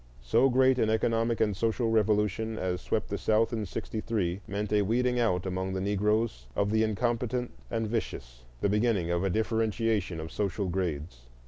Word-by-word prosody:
So 65 - +4
great 130 0 +4
an 110 - +2
economic 115 +1 +1
and 105 -2 +2
social 115 +2 0
revolution 110 0 +1
as 90 -2 -2
swept - - -1
the - - -3
South 110 +2 +2
in 110 -3 -2
'63 105 -2 -2
meant 105 +1 -3
a 105 - +4
weeding 125 +4 +1
out 90 -7 +1
among 95 0 -2
the 95 - -1
Negroes 105 - 0
of 100 0 +1
the 110 0 +3
incompetents 120 +3 -1 0.2
and 115 -1 -1
vicious, - - -4 0.2
the - - +3
beginning 105 -4 +1
of 85 +1 0
a 95 - +1
differentiation 110 -3 0
of 80 +1 -6
social 100 -1 -1
grades. 80 -8 -3
105 Hz, 175 wpm, -29 LUFS, 95-115 Hz, 0.2 s, So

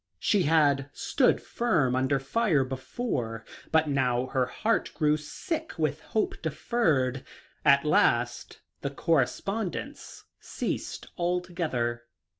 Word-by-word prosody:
She 200 - +2
had 145 -4 +3
stood - - +2
firm 160 - +1
under 130 +2 +2
fire 155 - +1
before, 130 - -4 0.3
but 160 -1 +3
now 130 -3 +1
her 130 -1 0
heart 225 - 0
grew 150 -1 +3
sick 320 - -4
with - - -1
hope - - -2
deferred. 135 - 0 0.4
At 140 +1 +5
last 120 -5 +1 0.2
the 140 - -2
correspondence 165 - -2 0.2
ceased - - -4
altogether. 170 -10 -1
145 Hz, 105 wpm, -28 LUFS, 130-180 Hz, 0.4 s, At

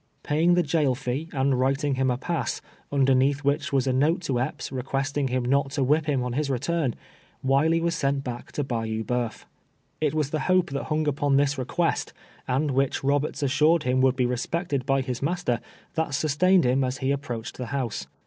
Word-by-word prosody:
Paying 165 +4 +3
tlie 175 - +2
jail 145 -4 +2
tec, 135 +4 -3
and 135 -3 +1
writing 135 +2 +1
Lini 130 0 +1
a 125 - -1
pass, 170 +5 -2 0.3
nnder 135 -2 +3
neatli 135 +2 +2
wlTu 140 +1 0
li - - 0
was 130 - +1
a 130 - +1
note 150 +7 +2
to 135 -8 -1
Epps, 130 +5 -3
requesting 135 +2 -1
Lini 125 -1 -1
not 140 +2 +2
to 140 -3 +1
wLip 150 +4 +2
Lim 135 -4 +1
on 125 - -3
Lis 140 +3 -1
return, 140 +1 0 0.5
Wiley 145 +5 +3
Avas 170 0 0
sent 140 -4 0
back 120 -2 -6
to 145 - -1
Bayou 115 -3 -2
Banif. 120 -2 -3 0.6
It 155 - +1
Avas 150 -2 0
tlie 155 +3 -2
Lope 185 -4 +3
tliat 140 +2 -4
Lung 155 0 0
upon 145 -1 +2
tLis 145 0 +1
request, 165 +7 -1 0.3
and 140 +3 +1
wLicli 135 +1 0
Roberts 145 +1 0
assured 150 +4 +3
Lim 130 +1 +2
would 130 0 +4
be 125 -1 +1
re 125 0 0
spected 145 -2 -2
by 135 0 +2
Lis 125 -2 -4
master, 140 -6 0 0.4
tLat 160 -4 0
sustained 160 +4 +3
Lim 130 +2 +2
as 130 0 -3
Le 135 +1 +2
ap 140 - -3
proacLed 115 -4 -5
tLe 125 -3 -7
Louse. 130 -6 -3
140 Hz, 210 wpm, -26 LUFS, 130-150 Hz, 0.6 s, would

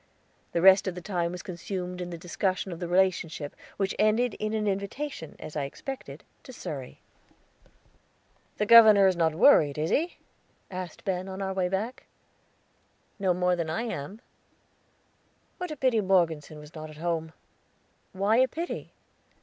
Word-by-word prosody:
The 170 - 0
rest 190 +1 +7
of 185 - -2
the 180 - -6
time 175 -3 -1
was 180 -2 -7
consumed 180 0 -5
in 175 - -4
the 170 - -6
discussion 185 +2 -2
of 170 - -6
the 175 - -3
relationship, 170 -5 0 0.2
which 195 -1 0
ended 220 +2 +3
in 215 0 -2
an 215 -1 -1
invitation, 200 - -4
as 155 - -9
I 145 -2 -1
expected, 270 - -8 0.2
to 260 - -12
Surrey. 140 - -7 1.6
"The 210 - +1
governor 215 -3 +8
is 190 -1 +4
not 165 -2 +1
worried, 160 - +5
is 155 +2 -1
he?" 340 +4 0 0.5
asked 185 0 -7
Ben, 185 -1 -2
on 190 0 -6
our 190 -1 -2
way 185 -1 0
back. 215 +7 -3 1.1
"No 190 -2 +2
more 180 0 +2
than 170 -2 -3
I 170 +8 -1
am." 205 -1 -5 1.4
"What 360 -1 -4
a 305 - -5
pity 255 -5 +2
Morgeson 165 -6 +1
was 150 +1 -12
not 155 -1 -8
at 155 - -12
home!" 160 -1 -2 0.8
"Why 200 +4 +2
a 260 +1 +5
pity?" 335 +7 -5
185 Hz, 160 wpm, -28 LUFS, 170-210 Hz, 1.6 s, governor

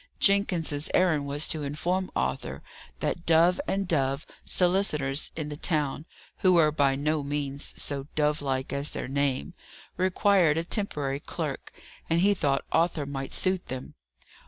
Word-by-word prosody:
Jenkins's 175 -7 +2
errand 160 -6 +2
was 145 +2 0
to 155 - +2
inform 175 +6 -2
Arthur 65 +1 -2 0.4
that 170 - -2
Dove 165 - +4
and 195 -1 -1
Dove 140 -3 0 0.2
(solicitors 160 -7 +2
in 155 -2 -4
the 150 - -5
town, 150 -1 -1 0.3
who 185 -1 +4
were 160 -3 +5
by 140 -3 +2
no 150 +2 0
means 140 0 -3
so 140 -1 -2
dove 150 0 +1
like 130 -2 -2
as 140 +1 +1
their - - -4
name) 135 - -1 0.4
required 185 -3 +3
a 165 - 0
temporary 150 -8 -1
clerk, - - -5 0.4
and 165 +1 +2
he 200 +2 +4
thought 140 -7 0
Arthur 165 -3 +1
might 135 -1 -5
suit 185 -1 +1
them. 130 0 -6
150 Hz, 150 wpm, -27 LUFS, 140-175 Hz, 0.4 s, were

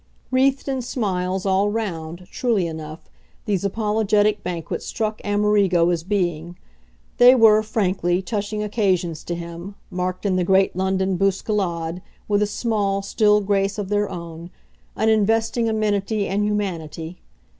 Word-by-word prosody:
Wreathed 270 +2 +2
in 265 -2 -1
smiles, 190 -6 -2
all 195 +1 +2
round, 180 -5 -4
truly 230 -8 0
enough, 160 -1 -7 0.4
these 200 -3 -1
apologetic 210 0 +1
banquets 170 -2 -4
struck 215 -1 -3
Amerigo 205 -4 +2
as 170 -2 -1
being; 175 -3 -2 0.6
they 250 +1 +8
were, 220 -3 +6
frankly, 190 -5 0
touching 210 +1 -3
occasions 190 -6 0
to 175 - -4
him, 170 +3 -8 0.2
marked, 180 +2 -3
in 190 -2 +1
the 180 - +1
great 190 +1 +3
London 190 0 0
bousculade, 185 -4 -1 0.3
with 205 -1 +2
a 210 - +2
small, 205 -2 -1
still 210 0 +3
grace 200 0 0
of 200 -2 -4
their 205 0 +1
own, 170 0 -8 0.5
an 220 - 0
investing 225 +2 +2
amenity 210 -1 0
and 200 +2 0
humanity. 175 -5 -4
195 Hz, 135 wpm, -22 LUFS, 180-215 Hz, 0.6 s, they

